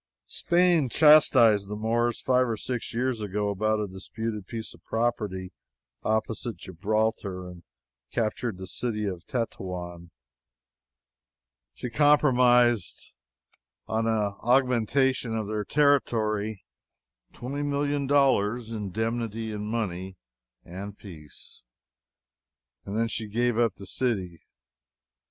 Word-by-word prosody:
Spain 175 -5 +2
chastised 115 -9 +6
the 105 - -3
Moors 115 +2 0
five 130 0 +2
or 110 - -1
six 125 +2 -4
years 125 -1 -1
ago, 105 0 -1
about 110 +2 0
a 105 - -1
disputed 105 +2 -5
piece 115 -2 -6
of - - -19
property 105 -5 -2 0.5
opposite 110 +1 -1
Gibraltar, 100 0 -2
and 90 -1 -11 0.5
captured 115 -2 -2
the 95 - -7
city 105 +1 -3
of 90 -3 -5
Tetouan. 90 -7 -4 1.7
She 125 - -6
compromised 125 - +3 0.7
on 110 +1 0
an 105 -3 +1
augmentation 125 0 +2
of 110 -2 -3
her 105 -1 -2
territory, 110 -6 +1 0.7
twenty 140 +4 -5
million 145 -1 -1
dollars' 120 -5 +2
indemnity 110 +1 -3
in 105 0 -4
money, 95 -4 -3 0.5
and 100 +3 -8
peace. 80 -7 -13 1.2
And 100 +2 -4
then 115 0 +2
she 110 -1 -3
gave 120 +3 0
up 115 -5 +2
the 100 - -11
city. 95 -7 -2
110 Hz, 110 wpm, -27 LUFS, 100-125 Hz, 1.7 s, chastised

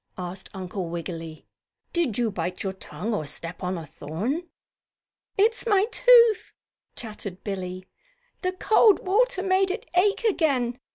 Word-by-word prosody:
asked 185 +1 -6
Uncle 185 -1 -4
Wiggily. 165 -1 -6 0.5
"Did 325 - +1
you 235 -3 +1
bite 180 -1 -3
your 190 -1 -2
tongue 190 +3 -5
or 205 - -1
step 165 +4 -6
on 185 0 -2
a 165 - -6
thorn?" 175 - -4 0.9
"It's 450 +4 +2
my 405 -2 +4
tooth," 470 -4 +5 0.4
chattered 210 -5 -7
Billie. 185 -2 -5 0.6
"The 365 0 -1
cold 425 +2 +4
water 410 +1 +2
made 380 0 +3
it 440 +5 -4
ache 395 +5 +3
again. 275 - +1
225 Hz, 135 wpm, -25 LUFS, -, 0.9 s, tooth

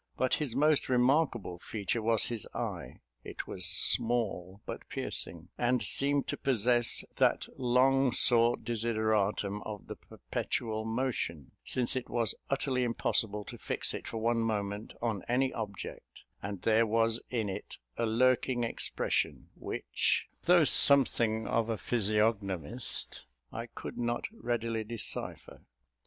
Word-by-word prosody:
But 130 - +1
his 140 -6 -1
most 150 0 +3
remarkable 125 - +2
feature 110 +4 -2
was 110 0 +3
his 115 -4 -4
eye; - - -5 0.2
it - - -6
was 90 -2 -2
small, 100 -4 +2
but - - -7
piercing, 85 0 -2
and 120 -1 +2
seemed 140 +5 +2
to - - -2
possess 120 -2 +2
that - - +3
long 130 +1 +3
sought 120 0 +4
desideratum 110 -3 0
of 105 +1 -7
the - - -7
perpetual 110 -2 -4
motion, 110 - -2
since 125 -1 +1
it 130 - -3
was 115 -4 0 0.2
utterly 135 -2 0
impossible 110 -3 0
to - - -9
fix - - -1
it - - -6
for - - -5
one 115 +1 +1
moment 105 -2 -2
on 110 -5 -1
any 130 +2 +1
object: 105 -4 -7 0.2
and 100 -2 -5
there 115 +1 +4
was 115 +1 +2
in 115 -4 -1
it 95 - -6 0.2
a 115 - 0
lurking 125 +2 +2
expression, 115 - -1
which, - - -1 0.2
though 175 -1 +6
something 120 -6 +3
of 115 0 0
a 115 - 0
physiognomist, 105 - -1 0.3
I - - -5
could - - -8
not 120 0 -1
readily 115 - -2
decipher. 115 +1 -5
115 Hz, 135 wpm, -31 LUFS, 105-125 Hz, 0.3 s, though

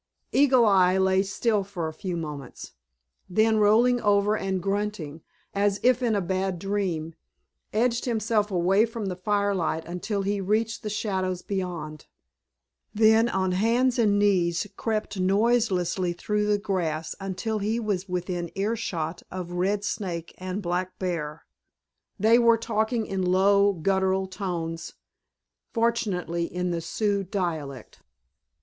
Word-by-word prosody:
Eagle 265 -4 +5
Eye 190 -3 +4
lay 190 0 +3
still 200 +2 0
for 185 -4 -4
a 160 - -5
few 180 +1 -4
moments, 150 -5 -7 0.6
then 220 +4 +3
rolling 230 +4 +4
over 205 0 +3
and 190 -3 -1
grunting, 195 -5 -3 0.3
as 200 0 +1
if 255 0 +4
in 235 -3 +1
a 200 - +1
bad 190 0 -1
dream, 180 -4 -2 0.6
edged 235 +2 +1
himself 220 -3 0
away 190 +2 +3
from 225 -2 -3
the 185 -2 -3
firelight 190 -4 0
until 195 +4 -3
he 200 0 -1
reached 220 +4 0
the 210 - -4
shadows 190 -4 -2
beyond, 175 -6 -4 0.9
then 220 +2 +5
on 190 -3 0
hands 235 +6 +2
and 205 -3 +3
knees 185 -3 +2
crept 215 -3 -2
noiselessly 190 -3 +1
through 210 +4 -1
the 210 0 +3
grass 175 -6 -2
until 195 +3 -3
he 215 +3 -1
was 200 -4 -2
within 180 -1 -3
earshot 195 -6 -2
of 180 -1 -6
Red 195 +3 0
Snake 175 -6 -4
and 185 +2 -4
Black 180 +1 -2
Bear. 165 -4 -4 0.7
They 225 +4 +5
were 235 -1 +5
talking 225 0 -1
in 195 -2 -3
low, 200 +2 +4
guttural 190 +2 +1
tones, 175 -4 -4 0.8
fortunately 210 -8 0
in 180 0 -2
the 170 -1 -2
Sioux 200 +2 -1
dialect. 160 - -4
195 Hz, 135 wpm, -26 LUFS, 180-215 Hz, 0.9 s, Eagle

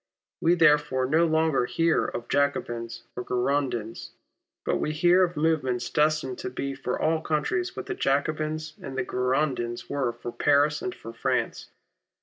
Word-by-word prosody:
We 170 +2 +4
therefore 150 -5 +4
no 160 +5 +3
longer 160 -5 +2
hear 165 +2 +2
of 120 - -5
Jacobins 120 -5 -1
or 125 - -4
Girondins, 125 -3 -1 0.5
but - - +1
we 150 - -1
hear 175 +3 +4
of 175 -2 -1
movements 145 -6 0
destined 150 -4 +1
to - - -4
be 140 +2 -4
for 130 -2 -3
all 160 0 +1
countries 360 - -1
what - - -5
the 395 - -3
Jacobins 155 - -1
and 135 -1 -6
the - - +1
Girondins 125 -2 -1
were 140 -4 0
for 120 0 -7
Paris 145 +2 +2
and 185 - -4
for 115 - -10
France. - - -1
145 Hz, 155 wpm, -26 LUFS, 125-160 Hz, 0.5 s, We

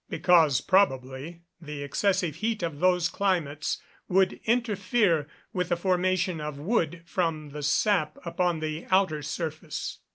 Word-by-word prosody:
_ - - -44
Because, 165 -7 +4
probably, 155 -3 +1 0.2
the 150 -2 -6
excessive 170 +2 0
heat 220 +1 -1
of 160 -4 -3
those 180 -1 +3
climates 165 -7 -1 0.3
would 190 0 +2
interfere 210 - +1 0.3
with 180 -2 -1
the 175 - +1
formation 185 -1 +1
of 150 -1 -5
wood 170 -1 -1
from 165 -4 -2
the 150 +1 -6
sap 155 +1 +1
upon 175 -1 0
the 155 +1 -4
outer 185 -5 +2
surface. 155 +1 -5
170 Hz, 135 wpm, -27 LUFS, 150-185 Hz, 0.3 s, Because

